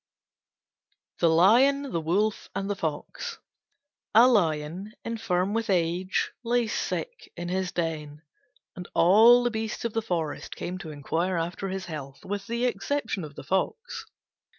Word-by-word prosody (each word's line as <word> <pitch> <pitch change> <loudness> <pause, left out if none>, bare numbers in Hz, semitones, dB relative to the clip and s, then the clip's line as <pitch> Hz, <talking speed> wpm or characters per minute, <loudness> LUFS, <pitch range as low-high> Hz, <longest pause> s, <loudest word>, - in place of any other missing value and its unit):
THE 170 - +4
LION, 255 +12 +5
THE 165 - -1
WOLF, 200 +7 0
AND 195 - -2
THE - - -1
FOX 160 -5 -4 0.8
A 235 +3 +9
Lion, 175 -2 +1
infirm 200 -4 -1
with 225 -1 -1
age, 180 +1 +1
lay 240 0 +2
sick - - -4
in 175 0 -4
his 185 0 -1
den, 155 -3 -3 0.5
and 180 0 -7
all 225 +7 +7
the 240 - +1
beasts 220 0 -3
of 230 - -2
the 225 - 0
forest 165 -8 -3
came 180 +1 -5
to 170 -5 -7
inquire 165 +5 -1
after 170 +3 -3
his 190 0 -4
health 140 -5 -8
with 200 0 -4
the 235 +2 0
exception 245 -6 -1
of 150 -2 -9
the - - -8
Fox. 450 - -2
190 Hz, 150 wpm, -27 LUFS, 165-225 Hz, 0.8 s, A